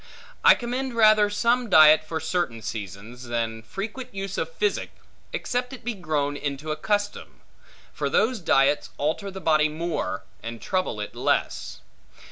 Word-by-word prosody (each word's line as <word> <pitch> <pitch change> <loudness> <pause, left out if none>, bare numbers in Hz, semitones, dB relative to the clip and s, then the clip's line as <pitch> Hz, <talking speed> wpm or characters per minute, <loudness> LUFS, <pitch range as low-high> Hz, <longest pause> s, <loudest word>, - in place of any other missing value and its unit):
I - - +8
commend 250 +1 -3
rather 215 -2 +6
some 235 +3 +1
diet 155 -2 +8
for 160 +1 -4
certain 160 -8 -2
seasons, 110 +4 -7
than 115 -1 -2
frequent 205 - -6
use 195 0 -4
of - - -3
physic, 425 -4 -1 0.4
except 250 +1 -2
it 260 - -10
be 240 +1 -2
grown 150 -7 -1
into 145 +1 -4
a - - 0
custom. 205 +5 -2 0.5
For - - -2
those 225 +2 +2
diets 140 -4 +2
alter 160 +7 -1
the 190 0 -7
body 155 -3 +3
more, 155 - -3 0.2
and 115 0 -6
trouble 185 - -2
it 105 - -6
less. - - -1
160 Hz, 150 wpm, -25 LUFS, 140-215 Hz, 0.5 s, I